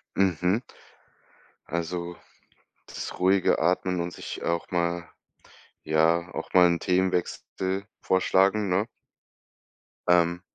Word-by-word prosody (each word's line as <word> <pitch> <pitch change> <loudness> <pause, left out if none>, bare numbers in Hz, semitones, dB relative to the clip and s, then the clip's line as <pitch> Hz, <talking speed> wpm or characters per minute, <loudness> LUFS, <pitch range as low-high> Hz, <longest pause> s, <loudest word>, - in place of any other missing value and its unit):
Mhm. 95 +1 +2 1.1
Also 85 +1 -3 0.7
das - - -7
ruhige 95 0 +3
Atmen 90 +2 +1
und 85 0 -3
sich - - -7
auch 85 0 -2
mal 85 -1 -1 0.8
ja, 80 +3 +2
auch - - -6
mal 90 -1 +7
'n 85 -1 +1
Themenwechsel 95 +1 -1 0.2
vorschlagen, 95 +2 +2
ne? 95 +5 +1 1.2
Ähm. 85 0 +3
90 Hz, 95 wpm, -26 LUFS, 85-95 Hz, 1.2 s, mal